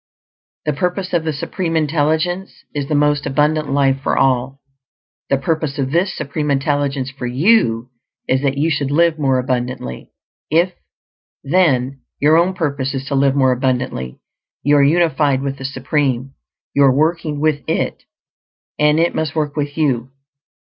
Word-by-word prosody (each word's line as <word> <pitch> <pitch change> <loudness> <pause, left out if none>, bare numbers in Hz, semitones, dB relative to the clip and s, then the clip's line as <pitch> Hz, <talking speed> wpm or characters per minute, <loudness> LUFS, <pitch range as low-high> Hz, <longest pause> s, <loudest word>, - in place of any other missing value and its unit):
The 150 - +1
purpose 180 +5 -2
of 165 -2 +1
the 160 - 0
Supreme 165 +3 -2
Intelligence 160 +4 -1
is 145 -2 -3
the 150 - 0
most 145 0 +2
Abundant 150 +1 +1
Life 135 -1 +2
for - - 0
all; 135 0 +1 0.7
the 140 - +3
purpose 155 0 -2
of 135 -2 -1
this 175 +5 +1
Supreme 150 +1 -3
Intelligence 140 -1 0
for 135 -2 -5
you 125 - +2 0.4
is 130 0 +1
that 140 -1 0
you 160 +3 +1
should 140 -2 -1
live 160 +2 +2
more 135 -3 +2
abundantly. 125 - -3 0.4
If, 170 +4 +2 0.7
then, 140 -5 +1 0.2
your 150 +2 +4
own 175 +3 +3
purpose 140 -5 -2
is 135 0 -4
to - - -2
live 135 0 +3
more 130 -2 +3
abundantly, 125 - -2 0.4
you 145 +2 +4
are 140 - +5
unified 150 -3 +2
with 135 -1 -3
the 135 - -6
Supreme; 135 -1 -1 0.4
you 140 - +2
are 135 - +6
working 155 +1 0
with 150 -1 +1
It, - - -2 0.7
and 150 +1 +4
it 170 +1 +2
must 160 -1 -2
work 150 -2 -1
with 145 0 -3
you. 130 -6 0
145 Hz, 160 wpm, -18 LUFS, 135-155 Hz, 0.7 s, are